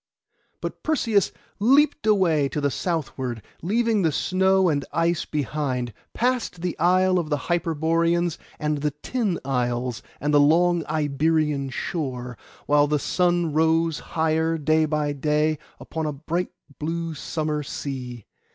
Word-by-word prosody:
But - - -5
Perseus 230 - +1 0.3
leaped 280 +4 +3
away 170 -9 +3
to 150 - -3
the 145 -1 +1
southward, 130 - -3 0.2
leaving 220 +3 +1
the 165 -3 +2
snow 190 +4 +2
and 145 -4 +1
the - - -10
ice 165 0 +1
behind: 135 -5 -2 0.2
past 240 -8 -1
the 180 -1 -2
isle 185 +2 +4
of 160 -3 -3
the 145 - +1
Hyperboreans, 170 +1 0 0.2
and 150 -1 -1
the 150 +1 +1
tin 220 -9 -1
isles, 125 -2 -1 0.2
and 150 +1 0
the 145 - +6
long 170 +3 +4
Iberian 150 -1 +1
shore, 130 -4 -4 0.3
while 145 0 +4
the 150 0 +2
sun 175 +1 +1
rose 160 0 +2 0.2
higher 160 +1 +2
day 155 +1 +2
by 150 -1 0
day 150 +1 +1 0.2
upon 160 -1 -4
a 150 - -2
bright 165 +5 -2 0.3
blue 165 +1 -2
summer 155 0 -2
sea. 125 -5 -6
160 Hz, 140 wpm, -24 LUFS, 145-175 Hz, 0.3 s, the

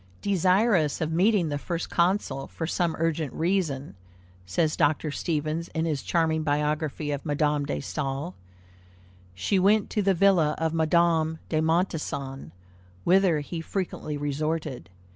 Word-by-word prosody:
"Desirous 190 -3 +2
of 160 -2 -1
meeting 180 0 +3
the 145 -1 -2
First 170 +2 -4
Consul 175 -6 0
for 165 - -5
some 170 0 0
urgent 160 -3 -1
reason," 160 -6 -1 0.5
says 155 - +1
Dr. 150 +1 +1
Stevens 155 +2 -2
in 160 0 0
his 150 -4 -1
charming 160 -2 +1
biography 150 0 -1
of 145 -1 -3
Madame 150 -1 0
de - - -2
Staël, 140 - -3 1.0
"she 190 - +1
went 205 +2 +3
to 210 - +1
the 195 -1 +2
villa 170 -5 +4
of 160 0 -1
Madame 160 0 +2
de 155 -1 +1
Montessan, 155 - -1 0.5
whither 180 -4 +4
he 165 +3 -5
frequently 165 -4 -4
resorted. 145 - -3
160 Hz, 135 wpm, -26 LUFS, 150-175 Hz, 1.0 s, villa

